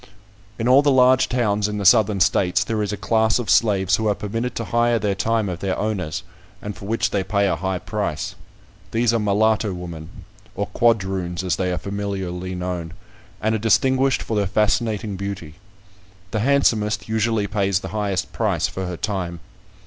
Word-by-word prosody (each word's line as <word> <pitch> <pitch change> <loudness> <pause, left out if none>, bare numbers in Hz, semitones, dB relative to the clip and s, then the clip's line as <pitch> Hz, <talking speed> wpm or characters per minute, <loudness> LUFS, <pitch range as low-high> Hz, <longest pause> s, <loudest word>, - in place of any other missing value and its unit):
In 115 -1 -1
all 130 +3 +7
the 145 - +2
large 130 -1 +4
towns 105 -4 +1
in 105 0 -3
the 100 - -3
Southern 105 +1 +5
States, 90 0 +2
there 110 -1 -2
is 105 - -1
a 105 - -3
class 110 0 +2
of 115 -7 -1
slaves 100 -2 +3
who 110 - -1
are 105 - +2
permitted 115 +5 -3
to 115 - -3
hire 120 +1 +2
their 105 -2 0
time 110 +2 0
of 90 -3 -4
their 95 0 -2
owners, 100 -8 -2 0.4
and 105 -1 -6
for - - -10
which 105 -2 0
they 100 -2 0
pay 100 +1 +1
a 95 - +1
high 95 -1 -2
price. - - -3 0.6
These 115 0 +1
are 115 - +2
mulatto 105 -1 +1
women, 85 -3 -8 0.5
or 100 - -1
quadroons, 95 -6 0
as 90 - 0
they 90 -1 -1
are 90 - -1
familiarly 95 -3 -4
known, 90 -2 -4 0.5
and 110 +1 0
are 110 - 0
distinguished 130 +4 +2
for 110 - -3
their 100 -2 +1
fascinating 105 0 0
beauty. 95 -5 -6 0.7
The 110 - -1
handsomest 110 -5 +2
usually 110 -1 0
pays 100 -2 0
the 95 - -6
highest 100 -2 -2
price - - 0
for 95 -1 -4
her 90 -1 -5
time. 90 -4 -3
105 Hz, 185 wpm, -22 LUFS, 95-110 Hz, 0.7 s, all